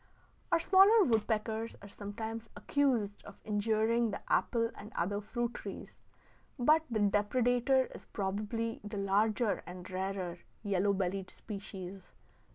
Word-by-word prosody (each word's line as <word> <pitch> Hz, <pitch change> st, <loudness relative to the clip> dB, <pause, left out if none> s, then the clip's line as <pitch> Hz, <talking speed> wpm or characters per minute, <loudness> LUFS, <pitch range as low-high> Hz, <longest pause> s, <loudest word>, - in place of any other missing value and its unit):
Our 335 Hz, -, +6 dB
smaller 395 Hz, +5 st, +7 dB
woodpeckers 220 Hz, -, 0 dB
are -, -, -8 dB
sometimes 220 Hz, +3 st, -6 dB
accused 240 Hz, -8 st, 0 dB
of 205 Hz, -, -12 dB
injuring 220 Hz, +2 st, +2 dB
the 200 Hz, -, -4 dB
apple 230 Hz, -2 st, +2 dB
and 210 Hz, +2 st, -10 dB
other 200 Hz, +4 st, -1 dB
fruit 240 Hz, +3 st, -2 dB
trees, -, -, -8 dB, 0.6 s
but 305 Hz, +5 st, +5 dB
the 230 Hz, -, -1 dB
depredator 245 Hz, +6 st, +2 dB
is -, -, -11 dB
probably 215 Hz, +3 st, -2 dB
the 210 Hz, 0 st, -5 dB
larger 205 Hz, +3 st, +2 dB
and 180 Hz, 0 st, -8 dB
rarer 185 Hz, -2 st, -3 dB, 0.2 s
yellow 200 Hz, -1 st, +2 dB
bellied 190 Hz, 0 st, -2 dB
species. 195 Hz, -3 st, -8 dB
215 Hz, 125 wpm, -33 LUFS, 200-235 Hz, 0.6 s, smaller